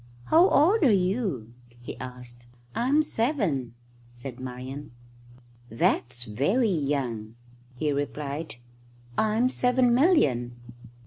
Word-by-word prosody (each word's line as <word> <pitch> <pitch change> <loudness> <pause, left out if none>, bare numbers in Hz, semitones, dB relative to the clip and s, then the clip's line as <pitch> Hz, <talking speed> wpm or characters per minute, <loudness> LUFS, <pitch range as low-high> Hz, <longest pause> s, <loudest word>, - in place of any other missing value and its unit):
"How 345 +4 +6
old 370 +10 +4
are 275 -8 +5
you?" 185 - 0 0.3
he 120 - -8
asked. 125 -1 -9 0.3
"I'm 275 +6 +2
seven," 205 - -1 0.3
said 120 +1 -9
Marian. 130 +2 -7 0.8
"That's 120 +2 0
very 145 - +1
young," 130 -8 -2 0.4
he 150 +4 -1
replied. 145 +2 -4 0.6
"I'm 220 - +2
seven 250 -1 +2
million." 145 - +3
145 Hz, 100 wpm, -26 LUFS, -, 0.8 s, How